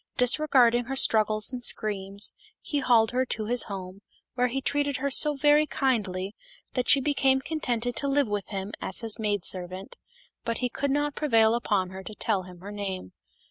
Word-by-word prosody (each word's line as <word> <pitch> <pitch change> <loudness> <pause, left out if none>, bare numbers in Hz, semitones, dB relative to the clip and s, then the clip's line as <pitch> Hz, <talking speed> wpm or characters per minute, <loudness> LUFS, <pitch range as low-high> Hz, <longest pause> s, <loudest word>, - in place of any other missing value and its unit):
Disregarding 250 -2 +3
her 270 +3 -4
struggles 215 -1 +2
and 245 -1 -5
screams, 200 -2 +1 0.3
he 290 - -3
hauled 230 -4 +3
her 255 +1 +1
to 215 -2 -2
his 245 +3 +2
home, 190 -1 -8 0.3
where 250 0 +1
he 255 +2 -3
treated 285 0 -1
her 280 +2 -2
so 295 +2 +5
very 295 +2 +3
kindly 205 -9 -2 0.4
that 250 -1 -2
she 280 - +7
became 270 -1 +2
contented 245 -5 -3
to 280 - -1
live 280 -1 +1
with 205 -2 -3
him 195 0 -5
as 190 - +1
his 225 -2 +1
maid 205 -4 -1
servant; 185 +1 -2 0.5
but 230 0 -2
he 250 - -1
could 280 +3 -3
not 290 +1 0
prevail 225 -7 +2
upon 205 -6 -1
her 190 0 -8
to 210 +2 -9
tell 205 -3 -1
him 180 -1 -13
her 200 +2 -8
name. 195 - -5
230 Hz, 185 wpm, -26 LUFS, 200-270 Hz, 0.5 s, she